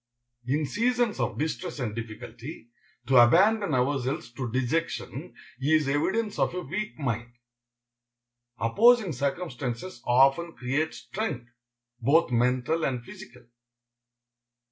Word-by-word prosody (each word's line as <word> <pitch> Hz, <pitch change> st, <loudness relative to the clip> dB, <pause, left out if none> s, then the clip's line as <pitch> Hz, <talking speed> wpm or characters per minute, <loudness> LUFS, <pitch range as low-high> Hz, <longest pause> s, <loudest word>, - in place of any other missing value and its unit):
In 145 Hz, +4 st, +1 dB
seasons 240 Hz, -, 0 dB
of -, -, -1 dB
distress 160 Hz, +3 st, -3 dB
and 120 Hz, -6 st, -3 dB
difficulty, 115 Hz, +3 st, -8 dB, 0.3 s
to 130 Hz, 0 st, +4 dB
abandon 185 Hz, -, +5 dB
ourselves 130 Hz, -2 st, -1 dB
to 125 Hz, -2 st, -4 dB
dejection 130 Hz, +7 st, -2 dB, 0.2 s
is 150 Hz, +1 st, +2 dB
evidence 200 Hz, +10 st, 0 dB
of -, -, +1 dB
a 180 Hz, -, -2 dB
weak 190 Hz, +8 st, -4 dB
mind. 120 Hz, -4 st, -3 dB, 1.3 s
Opposing 215 Hz, -, +4 dB
circumstances 135 Hz, -2 st, -4 dB
often 135 Hz, +7 st, +3 dB
create 135 Hz, +5 st, -2 dB
strength, 125 Hz, -, -5 dB, 0.5 s
both 160 Hz, 0 st, +3 dB
mental 125 Hz, +6 st, +1 dB
and 125 Hz, -4 st, -2 dB
physical. 125 Hz, +1 st, -12 dB
140 Hz, 105 wpm, -27 LUFS, 125-170 Hz, 1.3 s, abandon